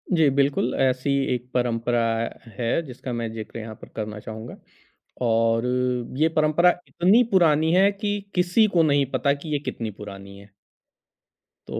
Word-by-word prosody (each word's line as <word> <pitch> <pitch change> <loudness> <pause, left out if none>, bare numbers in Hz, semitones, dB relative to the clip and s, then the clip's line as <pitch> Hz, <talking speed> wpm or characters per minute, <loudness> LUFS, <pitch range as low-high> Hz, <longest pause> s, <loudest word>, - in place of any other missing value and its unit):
जी, 160 -3 +4
बिल्कुल 140 -2 +1
ऐसी 130 +1 +1 0.2
एक 125 0 -5
परंपरा 120 -1 0 0.6
है 120 +6 0
जिसका 125 -1 -7
मैं 115 -1 -3
ज़िक्र 115 +1 -7
यहाँ 110 -1 -8
पर - - -11
करना 105 -1 -5
चाहूँगा। 110 +2 -8 0.7
और 115 0 +2 0.5
ये 160 +3 +3
परंपरा 155 +3 +4 0.2
इतनी 195 +8 +4
पुरानी 160 -4 +4
है 195 +2 +5
कि 205 0 -2 0.2
किसी 180 +5 +3
को 165 - +5
नहीं 145 -2 +3
पता 140 -1 +1
कि 145 +2 -8
ये 145 - +1
कितनी 115 -2 -4
पुरानी 100 -1 -10
है। 100 +1 -16 1.2
तो - - -4
130 Hz, 155 wpm, -24 LUFS, 115-160 Hz, 1.2 s, है